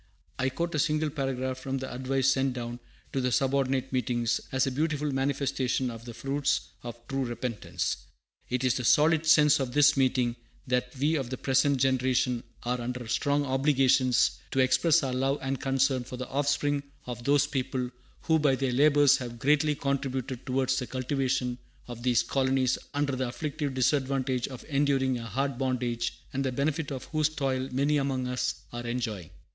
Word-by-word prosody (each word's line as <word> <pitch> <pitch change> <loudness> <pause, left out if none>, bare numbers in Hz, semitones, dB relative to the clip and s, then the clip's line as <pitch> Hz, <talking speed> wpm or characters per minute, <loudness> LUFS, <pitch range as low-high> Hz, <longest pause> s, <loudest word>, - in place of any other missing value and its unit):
I 130 +1 +2
quote 170 +6 -3
a 155 - 0
single 155 +1 +1
paragraph 130 -2 -2
from 135 +1 -3
the 130 0 -5
advice 130 +1 +1
sent 135 -1 +1
down 120 -1 -5 0.3
to 135 - 0
the 125 0 0
subordinate 135 0 +1
meetings, 120 -2 0
as 130 0 +2
a 135 - -1
beautiful 150 +1 -1
manifestation 135 -2 0
of 115 0 -10
the 120 - -7
fruits 135 +4 -1
of 120 -1 -7
true 135 0 -1
repentance: 115 -9 -3 0.5
"It 125 +1 -1
is 130 -2 +3
the 125 - -3
solid 155 +5 +4
sense 150 -3 +6
of 130 -3 -2
this 145 0 +5
meeting, 125 -3 +1 0.3
that 125 -1 0
we 145 +4 +2
of 135 -6 -1
the 130 - -4
present 140 +2 +2
generation 130 -1 +1 0.2
are 125 0 -1
under 125 0 -4
strong 145 +4 +1
obligations 130 -2 +3
to 135 - -1
express 135 +5 +4
our 130 -2 -1
love 135 +2 +1
and 135 0 -3
concern 135 -1 +1
for 125 +1 -8
the 130 0 -5
offspring 145 +1 +1 0.2
of 120 -1 -6
those 145 +2 +3
people 130 -3 -2 0.3
who 160 -1 +2
by 145 -3 +3
their 130 -1 -1
labors 145 +1 +5
have 120 -2 -6
greatly 150 +4 +2
contributed 135 -2 -3
towards 130 +1 +1
the 125 - -4
cultivation 130 -1 -1 0.3
of 120 -1 -8
these 120 -1 +3
colonies 130 -1 +1 0.2
under 145 -2 0
the 130 0 -1
afflictive 145 +1 -3
disadvantage 130 -1 +1
of 130 -3 -9
enduring 135 -3 +1
a 115 - -7
hard 135 +1 -2
bondage, 125 -3 -2
and 135 +1 -1
the 130 - 0
benefit 145 +4 -1
of 130 -2 -4
whose 155 -1 +2
toil 135 -3 -2
many 140 +3 +2
among 135 -2 -1
us 125 0 -2
are 120 0 -5
enjoying." 115 -8 -3
130 Hz, 175 wpm, -28 LUFS, 125-140 Hz, 0.5 s, sense